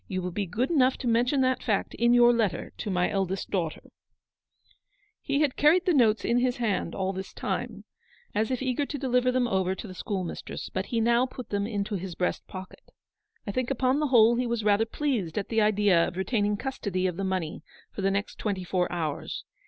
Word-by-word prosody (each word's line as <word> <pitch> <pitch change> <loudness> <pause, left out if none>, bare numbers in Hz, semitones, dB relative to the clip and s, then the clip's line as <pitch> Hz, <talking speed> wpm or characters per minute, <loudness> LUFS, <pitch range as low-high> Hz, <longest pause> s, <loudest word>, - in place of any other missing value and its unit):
You 185 -1 -3
will 180 - -3
be 200 +2 -2
good 240 - -1
enough 265 -5 +3
to 255 - -4
mention 245 +4 +2
that 255 -1 +1
fact 210 -5 -1
in 235 +1 +2
your 240 0 +6
letter 225 -6 -1
to - - -5
my 180 -2 +1
eldest 195 -1 -2
daughter," 170 -5 -2 1.4
He 280 +1 0
had 290 -4 +1
carried 330 +5 +4
the 360 - +3
notes 225 -6 +3
in 235 +1 +2
his 250 0 +1
hand 205 -8 -1
all 190 0 -1
this 190 +1 -6
time, - - -4 0.5
as 215 +1 0
if 255 0 -2
eager 265 +2 0
to 290 - -4
deliver 250 -2 +2
them 250 -1 +1
over 190 -3 0
to 215 - -8
the 185 - -8
schoolmistress, 185 -1 -5
but 190 +1 -2
he 230 - -1
now 235 +3 +3
put 255 -1 -9
them 200 0 -1
into 205 -2 -2
his 180 -1 -6
breast 180 - -2
pocket. 185 -1 -10 0.6
I 200 - -3
think 255 +3 -1
upon 265 +1 +1
the 305 - +1
whole 235 -2 +5
he 250 0 0
was 235 -2 -1
rather 210 +1 +3
pleased 225 - -2
at 200 - -2
the 225 -1 +2
idea 205 -5 +3
of 180 - -7
retaining 205 +1 0
custody 200 -8 -3
of 180 -2 0
the 195 - -3
money 185 -4 -2 0.3
for - - -6
the 195 - +2
next 200 +1 -2
twenty 200 -4 -2
four 180 0 -1
hours. 160 -4 -3
215 Hz, 215 wpm, -27 LUFS, 190-250 Hz, 1.4 s, your